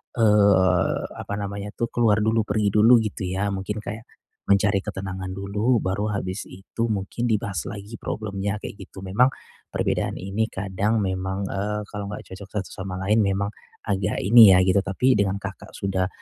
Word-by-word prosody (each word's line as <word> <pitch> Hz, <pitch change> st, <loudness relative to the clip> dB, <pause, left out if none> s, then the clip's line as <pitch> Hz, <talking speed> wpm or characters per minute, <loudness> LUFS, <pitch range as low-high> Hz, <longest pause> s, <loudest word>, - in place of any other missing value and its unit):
eee, 100 Hz, -5 st, +4 dB, 0.2 s
apa -, -, -5 dB
namanya 100 Hz, 0 st, -5 dB
tuh, 115 Hz, -, -2 dB
keluar 110 Hz, -3 st, +3 dB
dulu, 110 Hz, 0 st, +2 dB
pergi 105 Hz, -1 st, +1 dB
dulu 115 Hz, +3 st, +7 dB
gitu 105 Hz, -2 st, -4 dB
ya, 95 Hz, +2 st, -1 dB
mungkin 100 Hz, +2 st, -4 dB
kayak, 110 Hz, +1 st, -6 dB, 0.4 s
mencari 100 Hz, 0 st, +3 dB
ketenangan 95 Hz, -2 st, -5 dB
dulu, 105 Hz, +5 st, 0 dB
baru 105 Hz, +3 st, -1 dB
habis 95 Hz, -1 st, -3 dB
itu 100 Hz, +5 st, -4 dB
mungkin 100 Hz, +3 st, -3 dB
dibahas 100 Hz, -5 st, -1 dB
lagi 105 Hz, +2 st, -7 dB
problemnya 100 Hz, -2 st, -3 dB
kayak -, -, -7 dB
gitu. 95 Hz, -, -12 dB
Memang 100 Hz, +8 st, +2 dB, 0.4 s
perbedaan -, -, -1 dB
ini 100 Hz, +4 st, -2 dB
kadang 100 Hz, +3 st, -1 dB
memang, 95 Hz, 0 st, -2 dB
eee, 105 Hz, +2 st, -2 dB
kalau 100 Hz, -1 st, -6 dB
nggak 105 Hz, -, -8 dB
cocok 95 Hz, +1 st, -9 dB
satu 95 Hz, -, -6 dB
sama 95 Hz, -1 st, -5 dB
lain 110 Hz, +1 st, +4 dB
memang 100 Hz, 0 st, 0 dB, 0.4 s
agak 95 Hz, -2 st, 0 dB
ini 110 Hz, 0 st, +8 dB
ya, -, -, +6 dB
gitu, 95 Hz, +1 st, +4 dB
tapi 125 Hz, +7 st, +2 dB
dengan 100 Hz, -1 st, +1 dB
Kakak 100 Hz, -1 st, -8 dB
sudah 95 Hz, -2 st, -1 dB
100 Hz, 165 wpm, -24 LUFS, 95-105 Hz, 0.4 s, ini